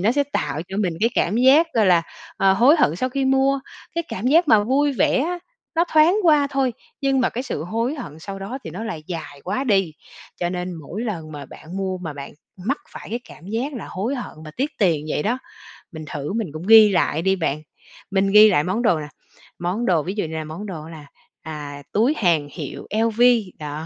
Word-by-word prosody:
nó 215 +6 +3
sẽ 285 - +2
tạo 160 - -2
cho 195 - -5
mình 190 -5 0
cái 230 +2 +3
cảm 195 +6 +1
giác, 270 +7 +6
gọi 220 -3 +4
là, 175 -2 +5 0.3
ờ, 195 0 +4
hối 245 - +5
hận 160 - +3
sau 255 - -1
khi 270 +1 -1
mua. 270 +1 +3 0.3
Cái 335 0 -1
cảm 200 +6 -4
giác 320 +4 +4
mà 205 -1 +5
vui 280 +4 +2
vẻ 260 - +2
á, 350 +4 -1 0.4
nó 335 +2 +3
thoáng 315 +5 +5
qua 300 -5 +5
thôi, 270 -3 +1 0.3
nhưng 270 -1 +2
mà 250 - +3
cái 250 - -4
sự 245 - -4
hối 230 - -1
hận 235 - -8
sau 195 +4 -7
đó 215 +7 -5
thì - - -6
nó 225 - -6
lại 165 -9 -5
dài 160 -5 -7
quá 210 +9 -2
đi. 195 - +2 0.4
Cho 175 - -1
nên 180 0 -4
mỗi 170 +7 -6
lần 165 -9 -5
mà 145 -2 -8
bạn 165 +7 -10
mua 190 -1 -2
mà 165 -4 -5
bạn 140 -1 -8 0.2
mắc 225 +11 -2
phải - - -10
cái 240 +1 -2
cảm 165 - -13
giác 235 +8 -2
là 240 - -6
hối 220 +9 -2
hận 250 - -6
mà 155 - -8
tiếc 275 +4 -1
tiền 165 -8 +2
vậy 150 - -1
đó, 240 +5 0 0.5
mình 155 -2 -8
thử 145 +4 -4
mình 220 -3 -1
cũng 160 +4 -7
ghi 220 -1 +9
lại 175 -4 +1
đi 190 +2 +2
bạn. 155 -4 -2 0.5
Mình 195 0 +2
ghi 210 +1 +9
lại 145 -6 +3
món 195 +7 -1
đồ 180 -9 +3
nè, 150 - -6 0.5
món 180 +7 -2
đồ 170 -8 +2
ví 185 +5 -3
dụ 210 - -1
như 160 0 -6
là 160 - -3
món 155 +7 -7
đồ 165 -5 -7
là, 155 -3 -10 0.4
à, 145 -2 -7
túi 235 +8 +3
hàng 165 -7 +2
hiệu - - -7
LV 225 +2 +1 0.4
đó, 150 +1 -5
200 Hz, 230 wpm, -22 LUFS, 165-250 Hz, 0.5 s, ghi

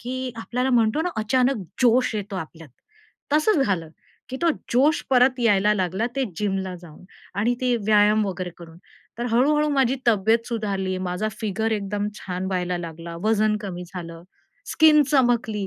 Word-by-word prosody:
की 255 +1 -4
आपल्याला 250 +3 -2
म्हणतो 235 +4 +2
ना 360 - -1
अचानक 255 +4 +1 0.3
जोश 245 -1 +3
येतो 205 -1 -4
आपल्यात. 165 -2 -8 0.6
तसंच 305 -1 +3
झालं 170 -5 -1 0.4
की 260 - -5
तो 340 - +4 0.2
जोश 290 +7 +3
परत 255 0 +4
यायला 210 -2 +3
लागला 190 +3 -1
ते 270 - +1
जिमला 190 -2 -2
जाऊन 165 0 -14 0.3
आणि 235 +4 +2
ते 250 -1 +1
व्यायाम 210 0 +4
वगैरे 185 -1 -4
करून. 165 -1 -13 0.4
तर 240 - -2
हळूहळू 295 +5 +3
माझी 265 -2 +2
तब्येत 225 +1 +2
सुधारली. 195 -5 -2
माझा 185 +3 -2
फिगर 220 +1 -1
एकदम 205 0 -2
छान 185 0 -4
व्हायला 180 -1 -2
लागला, 170 0 -7
वजन 215 -1 +2
कमी 180 -3 -6
झालं, 170 -2 -7 0.5
स्किन 305 -1 +6
चमकली. 235 -7 +1
215 Hz, 155 wpm, -23 LUFS, 185-250 Hz, 0.6 s, स्किन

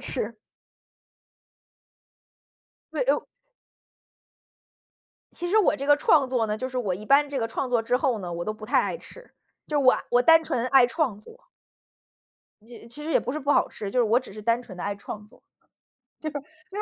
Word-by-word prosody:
吃。 230 -4 -1 2.6
对， - - 0
哎 - - -5
呦 - - -2 2.1
其 350 - -4
实 430 - +3
我 420 - +3
这 275 - -5
个 290 0 +6
创 290 -3 +3
作 240 -4 0
呢 210 0 -2
就 255 +3 -4
是 255 0 -4
我 200 -7 -1
一 210 +4 -9
般 280 +4 +4
这 280 -2 -3
个 225 - -1
创 255 +3 -3
作 240 -2 +1
之 245 +2 +1
后 255 -5 0
呢 175 -3 -6
我 170 0 -4
都 215 - -2
不 215 0 -11
太 - - +3
爱 - - -2
吃。 - - -13 0.4
就 300 -1 0
我 255 -1 +6 0.2
我 245 0 +4
单 325 +4 +6
纯 250 -5 -2
爱 260 -1 +6
创 250 -6 -1
作。 455 - -15 1.2
其 235 -1 -12
其 295 +6 -8
实 320 - -3
也 - - +4
不 250 - -4
是 305 - -3
不 285 0 -2
好 - - +3
吃， 200 -2 -7
就 250 - -1
是 - - +5
我 225 +3 +3
只 250 -6 -12
是 215 0 -9
单 235 +2 +1
纯 190 -6 -12
地 - - -6
爱 205 - -2
创 210 +1 -8
作。 210 - -22 1.3
就 405 - -7
是， - - -1
250 Hz, 215 characters per minute, -25 LUFS, 215-290 Hz, 2.6 s, 个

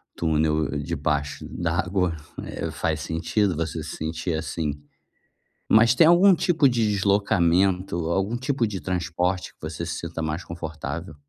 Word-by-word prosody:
túnel 80 -1 +1
debaixo 70 0 -2
d'água, 85 +1 -1 0.3
eh, - - -4
faz 80 -1 -2
sentido 85 +5 0
você 80 0 -3
se 80 - -7
sentir 80 +2 -3
assim. 80 -1 -2 1.0
Mas 115 +2 +6
tem 155 +5 +6
algum 180 +3 +7
tipo 165 -4 +3
de 115 -3 +1
deslocamento, 95 -2 +2
algum 95 +6 0
tipo 130 -1 0
de 100 -3 -4
transporte 90 0 -2
que - - -44
você 80 +2 -5
se 85 - -3
sinta 85 -1 -5
mais 80 +3 -3
confortável? 80 -2 -6
85 Hz, 140 wpm, -24 LUFS, 80-100 Hz, 1.0 s, algum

